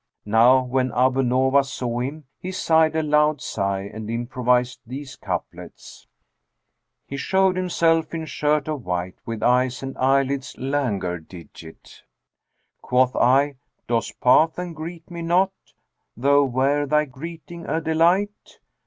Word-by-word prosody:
Now 120 +5 +5
when 130 0 -1
Abu 130 +2 +2
Nowas 130 +2 +2
saw 120 -1 -3
him, 140 +5 -4 0.2
he 185 - -5
sighed 160 -3 +2
a 160 - +1
loud 150 0 +2
sigh 100 -4 -2
and 105 +2 -8
improvised 125 +1 0
these 130 +3 -8
couplets, - - -7 1.0
"He 140 - -6
showed 190 +4 +2
himself 165 -3 +1
in 160 -1 -4
shirt 150 -1 0
of 150 -5 -4
white, 90 -1 -4
* - - -51
With 115 -1 -4
eyes 125 +1 +2
and 135 0 -5
eyelids 135 +1 +1
languor 115 -11 -2
digit. 80 -1 -14 0.8
Quoth 125 0 +2
I, 135 +3 +3 0.3
'Doss 115 -1 0
pass 155 +6 +3
and 180 -2 -5
greet 165 +2 -8
me 170 -1 -6
not? 180 +3 +2 0.4
* - - -53
Though 140 +3 +4
were 135 +3 +1
thy 150 +2 +2
greeting 165 +5 -9
a 160 +3 0
delight? 170 +6 0
135 Hz, 140 wpm, -23 LUFS, 125-160 Hz, 1.0 s, Now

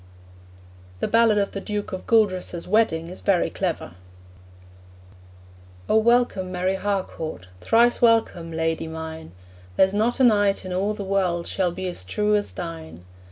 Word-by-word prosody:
The - - -1
ballad 230 -2 +4
of 200 -1 0
the 195 - -5
Duke 210 0 -4
of 185 - -6
Gueldres's 185 -6 +1
wedding 180 -6 +2
is 180 - -9
very 195 -4 +1
clever: 180 - -3 2.0
'O - - +3
welcome, 220 -5 +2
Mary 185 +1 0
Harcourt, 190 - -3
Thrice 235 - +3
welcome, 225 -8 +2
lady 160 0 -2
mine; 160 - -7 0.4
There's 190 - +3
not 220 +5 0
a - - +4
knight 205 -5 +3
in 185 - -4
all 200 +3 -1
the 205 - -5
world 185 -3 0
Shall 185 -2 -1
be 185 +2 -6
as 175 - -5
true 210 - 0
as 205 -1 0
thine. 165 - -8
190 Hz, 150 wpm, -23 LUFS, 170-210 Hz, 2.0 s, ballad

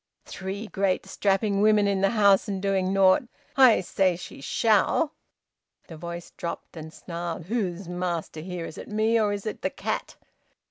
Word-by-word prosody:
Three 190 +3 -6
great 195 -3 -1
strapping 195 +1 +1
women 210 -1 +4
in 200 -1 +1
the 195 - +4
house 200 -3 +4
and 195 -2 -2
doing 190 -1 0
nought! 195 +5 +5 0.3
I 255 -7 +6
say 185 0 +1
she 165 - -10
shall!" 225 - +2 0.7
The 165 - -10
voice 170 +2 -7
dropped 170 - -6
and 160 -1 -8
snarled. 170 0 -6
"Who's 195 -4 -2
master 175 -3 -3
here? 175 +1 -5
Is 155 - -9
it - - -9
me, 220 +2 +2
or 210 -2 +2
is 205 0 -4
it 215 - -5
the - - 0
cat? - - -4
195 Hz, 170 wpm, -26 LUFS, 175-210 Hz, 0.7 s, I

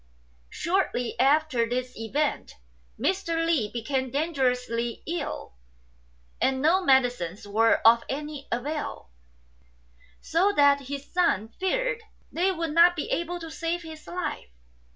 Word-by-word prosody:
Shortly 340 -10 -1
after 270 -3 +3
these 250 +1 -3
events 275 +7 -2 0.4
Mr. 335 -4 0
Li 295 -11 +1
became 260 +2 -2
dangerously 250 -5 -1
ill, 340 - -4 0.9
and 265 0 +2
no 340 +7 +3
medicines 245 - +1
were 225 +3 +4
of 230 +1 +7
any 295 0 -5
avail, 260 - -4 1.1
so 370 +5 +2
that 280 -2 +4
his 280 0 -7
son 335 - +2
feared - - 0 0.3
they 365 +3 +1
would 335 -3 -3
not 340 +2 +6
be 305 - -4
able 345 +1 -2
to 325 -1 -7
save 335 +2 -3
his 315 -1 -10
life. 350 - -4
290 Hz, 120 wpm, -26 LUFS, 245-335 Hz, 1.1 s, of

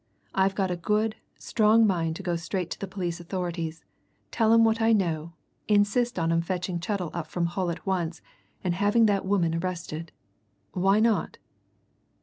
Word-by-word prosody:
"I've 190 0 +2
got 190 -2 0
a - - 0
good, 215 +5 0 0.2
strong 220 0 +3
mind 165 -5 0
to 195 - -7
go 175 -2 -1
straight 170 +1 -3
to - - -5
the 195 - -4
police 180 -2 -4
authorities, 170 -2 -4 0.5
tell 225 -2 +2
'em 230 0 +6
what 225 0 +2
I 225 0 +4
know, 170 -5 0 0.3
insist 210 +3 +2
on 165 -1 +1
'em 165 0 +2
fetching 180 0 -3
Chettle 180 -2 -3
up 170 -2 -4
from 170 +2 -1
Hull 175 +1 -1
at 170 - -5
once, 175 -3 -1 0.4
and 180 -2 0
having 205 +5 +3
that 200 -3 +1
woman 180 -5 +2
arrested. 165 -2 -4 0.6
Why 195 +3 +3
not?" 225 0 +1
185 Hz, 170 wpm, -27 LUFS, 170-205 Hz, 0.6 s, em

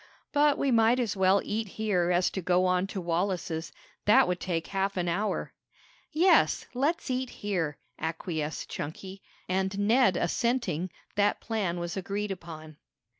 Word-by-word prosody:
"But 295 0 +4
we 275 - +1
might 230 +1 +4
as 230 -5 -1
well 190 +1 +3
eat 220 +1 -2
here 195 -5 +1
as 180 0 +2
to 190 - -3
go 180 +1 +2
on 180 +1 +2
to 195 - -5
Wallace's. 170 -1 -2 0.3
That 210 -2 +6
would 180 0 -1
take 170 -3 -2
half 195 0 -2
an 175 -1 0
hour." 200 +5 -1 0.6
"Yes, 350 +5 +4
let's 280 +3 0
eat 255 0 -1
here," 175 -11 -2 0.2
acquiesced 160 -1 -3
Chunky, 190 +6 -7 0.3
and 190 +1 -1
Ned 210 -1 +4
assenting, 185 -5 0 0.3
that 205 0 +2
plan 195 -6 -2
was 175 0 -4
agreed 200 +2 -3
upon. 160 -4 -8
"Mr. - - -19
190 Hz, 155 wpm, -28 LUFS, 175-220 Hz, 0.6 s, That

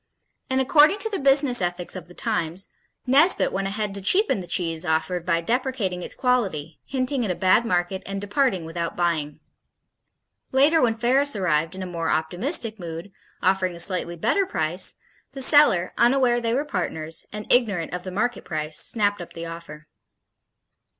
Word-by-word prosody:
And 260 0 +1
"according 300 +7 +4
to 445 - -1
the 395 - -2
business 275 -4 +3
ethics 175 0 -2
of 180 -2 -8
the 180 - -16
times," 170 +3 -3 0.4
Nesbit 285 +8 +3
went 195 0 -2
ahead 205 0 -3
to 200 - -5
cheapen 375 - +2
the 180 - -8
cheese 165 -1 -1
offered 175 +1 -1
by 170 -1 +1
deprecating 230 -4 -2
its - - -4
quality, 190 - -1
hinting 260 0 -1
at 215 - -2
a 180 - -1
bad 190 +6 +3
market 180 -1 -1
and 195 0 -5
departing 205 - 0
without 170 +1 -4
buying. 155 -4 -2 1.1
Later 290 +5 +4
when 230 -3 +2
Ferris 260 +4 +1
arrived 165 -4 0
in 190 - -6
a - - -5
more 170 -2 -3
optimistic 215 - -1
mood, 170 +2 -7 0.3
offering 185 -1 +1
a - - -11
slightly 175 -1 0
better 385 - 0
price, 165 - +3 0.4
the 275 - -8
seller, 260 - +4
unaware 240 0 +3
they 230 0 0
were 285 +3 -1
partners, 165 - -4
and 210 0 -6
ignorant 205 -9 +1
of 180 - -3
the 185 - -6
market 220 +6 -2
price, 155 -1 -2
snapped 205 -4 +2
up 175 - -10
the 165 0 -7
offer. 165 -2 -9
190 Hz, 170 wpm, -23 LUFS, 170-250 Hz, 1.1 s, according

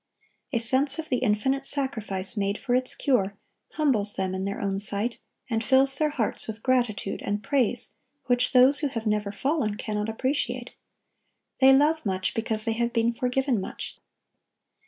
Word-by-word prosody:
A 250 - +1
sense 265 +5 +2
of 320 -1 -5
the 255 - +2
infinite 255 +4 +1
sacrifice 220 -10 -1
made 200 -1 -1
for 250 -3 -2
its 255 0 +4
cure, 205 -8 0 0.4
humbles 245 -10 +2
them 190 -1 -2
in 190 0 -3
their 200 0 -3
own 195 -1 -1
sight, 210 +3 -1 0.3
and 225 -2 -1
fills 270 +2 +3
their 305 -1 +2
hearts 250 -8 -2
with 220 0 -7
gratitude 240 -6 0
and 205 +1 -2
praise 245 0 0 0.3
which 245 0 +1
those 260 +2 +6
who 295 - 0
have 230 -4 -5
never 210 -1 0
fallen 240 -1 -1
cannot 210 0 -3
appreciate. 260 +6 -2 0.9
They 265 0 +7
love 300 +4 +3
much, 190 -3 -1
because 220 -1 -1
they 225 - +1
have 235 +1 -1
been 230 0 +1
forgiven 250 -2 0
much. - - -7
235 Hz, 165 wpm, -26 LUFS, 210-270 Hz, 0.9 s, They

